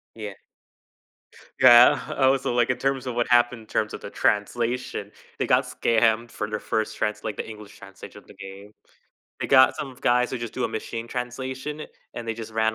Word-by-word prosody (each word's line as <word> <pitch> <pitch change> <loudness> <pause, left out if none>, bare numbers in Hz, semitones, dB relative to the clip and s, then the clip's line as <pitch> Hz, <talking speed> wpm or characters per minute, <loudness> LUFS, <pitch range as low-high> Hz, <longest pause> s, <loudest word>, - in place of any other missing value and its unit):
Yeah. 105 -3 -6 1.3
Yeah, 120 +4 +8 0.2
oh, 135 0 +4
so 125 - -3
like 120 0 +2
in 125 - +1
terms 135 -1 -1
of 120 - -3
what 120 - 0
happened 120 -1 +3
in 110 - -17
terms 105 -1 -1
of - - -7
the - - -7
translation, 115 0 -1 0.3
they - - -1
got - - +4
scammed 115 0 +1
for 105 - -4
their 110 - -3
1st 110 -1 -2
trans 105 0 -2
like, 110 -2 -4
the - - -5
English 105 -2 -11
translation 100 -1 -12
of - - -24
the - - -14
game. 100 +2 -11 0.7
They - - -2
got 130 -1 +5
some 135 -3 -6
guys 125 0 +2
who 130 - -3
just 120 -2 -6
do 130 - -2
a - - 0
machine 115 +1 -5
translation 130 +4 -5 0.3
and 120 -1 -6
they 115 - -1
just 110 -1 -8
ran 110 0 +1
115 Hz, 205 wpm, -24 LUFS, 110-125 Hz, 1.3 s, Yeah